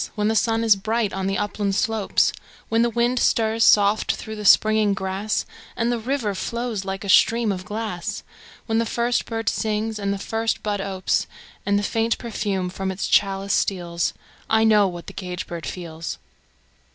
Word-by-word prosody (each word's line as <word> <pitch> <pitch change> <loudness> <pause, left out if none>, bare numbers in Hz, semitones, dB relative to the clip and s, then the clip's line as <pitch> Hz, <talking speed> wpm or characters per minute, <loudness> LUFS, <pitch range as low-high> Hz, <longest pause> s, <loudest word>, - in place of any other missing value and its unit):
When 210 0 +1
the 220 - +1
sun 225 +1 +2
is 220 -2 +6
bright 220 +1 -1
on 190 0 -2
the 195 - 0
upland 205 -1 -1
slopes; 220 -1 +1 0.4
When 225 +1 +2
the 235 - +3
wind 240 +2 +1
stirs 225 -1 +2
soft 205 +1 +4
through 220 -1 -7
the 210 -1 -7
springing 215 0 +5
grass, 190 +3 -2 0.3
And 230 +1 +1
the 240 - -1
river 235 -3 -1
flows 235 0 -3
like 195 +1 -4
a - - -6
stream 230 +2 +4
of 185 -1 -5
glass; 210 -5 -4 0.4
When 225 -1 +1
the 230 - 0
first 240 +2 0
bird 225 -2 -4
sings 215 0 -1
and 200 -1 -1
the 200 - -1
first 225 +3 -2
bud 205 -2 -1
opes, 190 -1 -1 0.4
And 200 0 +3
the 205 - -1
faint 225 +2 0
perfume 205 -5 -2
from 190 +1 -3
its 190 - -3
chalice 195 0 +2
steals 170 -3 -1 0.3
I 220 0 +4
know 210 -2 +5
what 175 -2 -7
the - - -9
caged 180 -2 -5
bird 170 -1 -6
feels! 165 -2 -6
210 Hz, 185 wpm, -23 LUFS, 195-225 Hz, 0.4 s, is